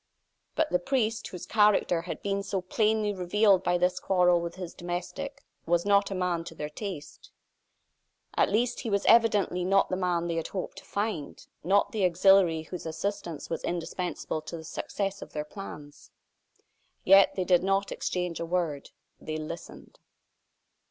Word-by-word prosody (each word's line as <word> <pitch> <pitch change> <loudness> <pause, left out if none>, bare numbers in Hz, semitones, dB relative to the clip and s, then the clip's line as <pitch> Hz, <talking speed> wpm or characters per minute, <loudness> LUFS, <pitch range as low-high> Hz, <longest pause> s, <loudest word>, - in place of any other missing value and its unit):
But 315 -1 +1
the 180 - +3
priest, 225 +1 -1
whose 180 - -8
character 210 -5 +3
had 170 - -7
been 200 0 -1
so 195 -1 -2
plainly 215 +2 +1
revealed 190 +1 +3
by 175 -1 +2
this 180 +1 +1
quarrel 180 -2 +3
with 170 0 -5
his 180 -2 -7
domestic, 175 +10 -5 0.2
was 175 +1 +2
not 200 0 +4
a 195 - -3
man 180 -2 -1
to 165 - -9
their 150 -1 -5
taste. 185 -3 -7 1.1
At - - +3
least, 235 +4 +1
he 230 - -4
was 200 -1 0
evidently 210 -5 +4
not 195 +2 +3
the 185 - 0
man 180 -2 0
they 170 -1 -2
had 165 - -2
hoped 190 - -5
to - - -18
find 200 -8 -4 0.2
not 195 +4 +3
the 210 -3 -1
auxiliary 180 -2 +4
whose 170 +1 -7
assistance 175 -1 -4
was 165 - -3
indispensable 175 -1 -3
to 155 +2 -7
the 160 - -9
success 195 +4 -4
of - - -10
their 150 0 -3
plans. 150 -5 -10 0.9
Yet 195 +1 +6
they 185 - 0
did 180 -1 +4
not 195 +1 0
exchange 180 -2 -2
a 170 - -2
word; 165 -5 -2 0.3
they 155 0 -4
listened. 160 +2 -9
180 Hz, 165 wpm, -28 LUFS, 170-200 Hz, 1.1 s, Yet